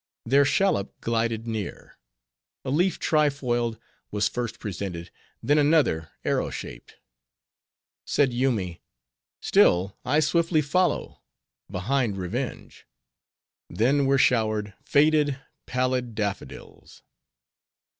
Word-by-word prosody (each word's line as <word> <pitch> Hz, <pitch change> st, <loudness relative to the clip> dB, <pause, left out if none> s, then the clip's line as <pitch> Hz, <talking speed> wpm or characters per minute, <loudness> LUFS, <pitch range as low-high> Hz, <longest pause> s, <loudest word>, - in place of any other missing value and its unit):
Their 140 Hz, +4 st, +4 dB
shallop 140 Hz, -, +1 dB
glided 115 Hz, -1 st, -1 dB
near. 110 Hz, -5 st, -6 dB, 0.7 s
A 130 Hz, -, -2 dB
leaf 175 Hz, +5 st, +2 dB
tri 150 Hz, -2 st, +2 dB
foiled 120 Hz, -5 st, -2 dB, 0.3 s
was 105 Hz, 0 st, +1 dB
first 120 Hz, -2 st, -4 dB
presented; 90 Hz, -4 st, -5 dB, 0.3 s
then 145 Hz, +5 st, +3 dB
another, 145 Hz, -, +2 dB, 0.2 s
arrow -, -, 0 dB
shaped. -, -, -9 dB, 1.1 s
Said 135 Hz, -4 st, +2 dB
Yoomy, 115 Hz, -9 st, -1 dB, 0.6 s
"Still 95 Hz, +3 st, +3 dB
I 130 Hz, +5 st, +2 dB
swiftly 165 Hz, 0 st, +2 dB
follow, 180 Hz, +6 st, 0 dB, 0.5 s
behind 105 Hz, +3 st, -1 dB
revenge." 115 Hz, +8 st, -5 dB, 0.8 s
Then 135 Hz, +5 st, +2 dB
were 135 Hz, 0 st, +3 dB
showered 110 Hz, -5 st, +1 dB
faded, 150 Hz, -1 st, +3 dB, 0.3 s
pallid 125 Hz, -2 st, -1 dB
daffodils. 100 Hz, -2 st, -6 dB
125 Hz, 95 wpm, -25 LUFS, 105-145 Hz, 1.1 s, Their